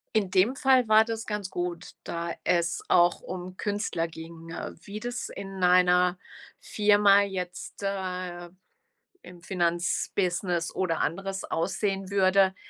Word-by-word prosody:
In 200 -4 +1
dem 195 +9 +3
Fall 260 -3 +3
war 220 0 +6
das 225 -1 -5
ganz 210 -3 -4
gut, 175 -1 -4
da 170 0 -4
es 170 -1 +1
auch 175 -1 +4
um 185 0 -7
Künstler 205 -5 -2
ging. 165 0 -11
Äh, 165 - -5
wie 205 +4 -7
das 245 +2 -4
in 195 -1 -7
einer 180 0 +4 0.4
Firma 205 -1 +4
jetzt, 185 -1 -5
äh, 185 -3 -4 0.7
im 175 -1 -13
Finanzbusiness 175 0 -1
oder 180 -3 0
anderes 195 +4 -2
aussehen 195 +3 -2
würde, 190 -1 +3
185 Hz, 130 wpm, -27 LUFS, 175-200 Hz, 0.7 s, war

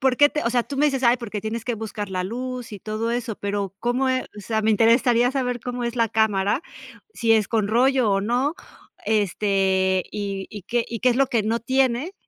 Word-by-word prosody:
¿Por 260 -2 +2
qué 290 0 +6
te 300 - -2
o - - +2
sea, 245 -1 +2
tú 275 +2 -7
me 300 - +4
dices: 270 -2 -1
"Ay, 240 0 +4
porque 215 -3 -5
tienes 220 +1 -3
que 240 - -1
buscar 210 -2 -5
la 185 -1 -2
luz 250 +2 -5
y 205 - -6
todo 220 +2 -3
eso," 235 -3 -3
pero, 200 -1 -3
¿cómo 250 +2 0
e 255 0 +1
o - - -7
sea, 220 +1 -2
me 220 - +2
interesaría 235 +3 +4
saber 250 -3 -1
cómo 245 0 -4
es 235 +1 -2
la 230 -1 +2
cámara, 210 - +1 0.5
si 230 -2 +2
es 215 -3 +3
con 215 -3 0
rollo 250 0 +3
o 195 0 +2
no, 250 +8 0 0.5
este 195 -2 +1
y 200 -2 -4
y 205 -3 -8
qué 240 +3 -1
y 230 -2 -5
qué 250 - +4
es 240 - 0
lo 275 0 +3
que 230 -3 +1
no 225 +2 -1
tiene, 260 - 0
230 Hz, 230 wpm, -23 LUFS, 210-250 Hz, 0.5 s, qué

